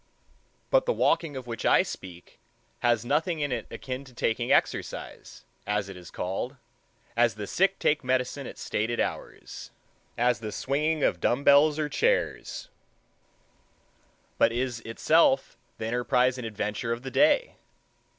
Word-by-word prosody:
But - - +4
the - - +3
walking 150 -5 +1
of 130 - -7
which 115 -1 -6
I - - +5
speak 90 -2 -10 0.4
has 120 -1 +2
nothing 160 +5 0
in 145 -2 -1
it 125 - -3
akin 130 0 -6
to 130 -2 -16
taking 120 0 0
exercise, - - -1 0.2
as 105 -1 -1
it 95 - -8
is 90 -1 -11
called, 95 +9 -4 0.6
as 120 -1 +3
the 105 -1 -5
sick 195 - +1
take 150 -1 +1
medicine 130 +2 -1
at - - -9
stated 115 +3 -2
hours—as 120 -2 -4
the 110 -1 -5
swinging 150 +5 0
of 85 - +2
dumb 130 +4 +1
bells 145 +2 +6
or 155 -1 0
chairs; 150 - -1 1.7
but - - +5
is 120 0 -2
itself 115 0 +2 0.2
the 110 - -4
enterprise 125 +2 +1
and 120 - -4
adventure 105 +2 -3
of 115 +2 -3
the 130 - -6
day. 310 - +3
125 Hz, 145 wpm, -27 LUFS, 115-145 Hz, 1.7 s, bells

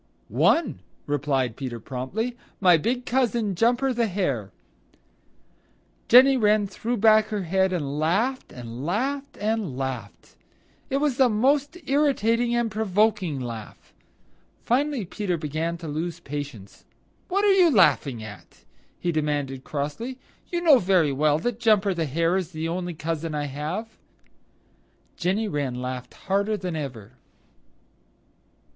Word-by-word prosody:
"One," 250 - +2 0.3
replied 135 -4 0
Peter 125 -4 -5
promptly, 140 - -4 0.2
"my 180 -3 +6
big 245 +10 -1
cousin, 235 -5 +1
Jumper 245 +7 +2
the 235 -1 +1
Hare." 140 - -2 1.6
Jenny 260 +3 +7
Wren 210 -2 +3
threw 230 +5 -3
back 215 0 +5
her 210 -3 -3
head 190 +2 +1
and 145 -5 -2
laughed 215 +12 0
and 120 +1 -8
laughed 270 - -2
and 210 - -2
laughed. 130 -6 -6 0.5
It 270 - +1
was 280 -3 0
a 260 -2 +6
most 275 +8 +1
irritating 245 -5 +2
and 235 -2 0
provoking 210 -6 +1
laugh. 115 -4 -8 0.7
Finally 265 -2 0
Peter 185 -1 -2
began 160 +2 -3
to 165 -1 -8
lose 165 +3 -3
patience. 145 - -7 0.4
"What 400 +2 +1
are 405 - +6
you 365 -3 +5
laughing 145 - +3
at?" 100 -5 -12 0.4
he 175 - 0
demanded 145 -4 -2
crossly. 155 - -4 0.3
"You 345 -1 -1
know 305 -7 +6
very 180 -6 +3
well 150 +2 +2
that 230 +7 -3
Jumper 210 -4 +3
the 165 -2 -1
Hare 165 +5 +1
is 185 -2 -4
the 160 +1 -3
only 175 0 -3
cousin 160 0 -3
I 145 -1 -1
have." 155 +11 -5 1.2
Jenny 195 +5 0
Wren 145 -8 -2
laughed 125 0 -6
harder 200 +2 0
that 180 -4 -4
ever. 125 -8 -6
185 Hz, 135 wpm, -25 LUFS, 145-230 Hz, 1.6 s, Jenny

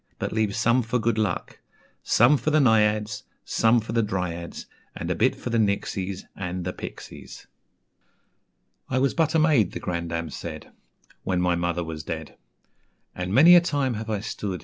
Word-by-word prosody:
But - - -3
leave 110 -2 0
some 120 +2 +3
for 115 +1 -1
good 115 -1 0
luck: 105 -5 -2 0.4
Some 120 +6 +4
for 150 - -1
the 155 - +3
Naïads, 110 -2 +2 0.2
Some 115 +1 +3
for 110 0 -7
the 115 0 +2
Dryads, 90 -5 -4 0.3
And - - -4
a - - 0
bit - - +2
for 120 - -6
the 115 - +2
Nixies, 100 -2 -1
and 90 -1 -4
the 90 - -3
Pixies,'" - - -10 1.4
"I - - 0
was 135 +1 +2
but 165 -1 +1
a - - +5
maid," 150 - +3
the - - -4
grandame 85 -2 -3
said, 80 -1 -8 0.5
"When 95 -1 -1
my 90 0 +2
mother 85 0 -1
was 80 -2 -6
dead; - - -6 0.8
And 90 0 -4
many 155 - +7
a 175 - +8
time 145 -6 0
have 110 0 -6
I 105 -2 -1
stood. 100 -3 -4
105 Hz, 175 wpm, -25 LUFS, 90-120 Hz, 1.4 s, a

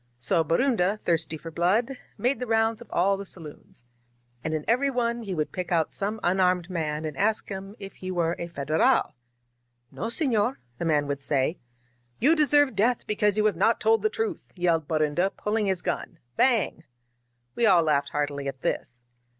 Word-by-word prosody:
So 165 +8 +2
Borunda^ 205 - +1
thirsty 165 -1 -1
for 165 +2 -9
blood, 210 - +1 0.2
made 255 +3 0
the 250 - -4
rounds 225 0 +1
of 240 - -12
all 195 +3 +2
the 200 - -6
saloons. 150 -8 -9 0.6
And 155 - -2
in 155 - -4
every 255 +5 +2
one 235 -2 -1
he 195 -5 -4
would 155 -2 -2
pick 180 -1 -5
out 165 -3 +1
some 210 +2 -3
unarmed 180 0 +2
man 155 -3 -2
and 155 -2 -4
ask 215 +7 0
him 195 +1 -7
if 195 -1 -10
he 185 - -6
were 170 -2 0
a 170 - -4
Federal. 155 -1 +1 0.8
*No, - - -5
sefior,' 240 -2 +1 0.2
the - - -2
man 150 -3 +2
would 140 -1 -3
say. 140 +4 0 0.6
*You 300 +7 +4
deserve 290 -4 +3
death 230 +5 +1
because 210 -1 +1
you 215 - +2
have 210 -4 +2
not 210 +6 +2
told 225 +1 +3
the 435 - +2
truth!' 445 -5 -4
yelled 170 -4 +1
Borunda, 155 +3 +1
pulling 210 0 -1
his 190 -2 0
gun. 175 - -3 0.2
Bang 225 - +2 0.3
!" 120 0 -47
We 235 - +3
all 180 -4 +5
laughed 145 -2 +1
heartily 145 -1 -2
at 135 -1 -6
this. 125 -1 -3
185 Hz, 185 wpm, -26 LUFS, 155-225 Hz, 0.8 s, all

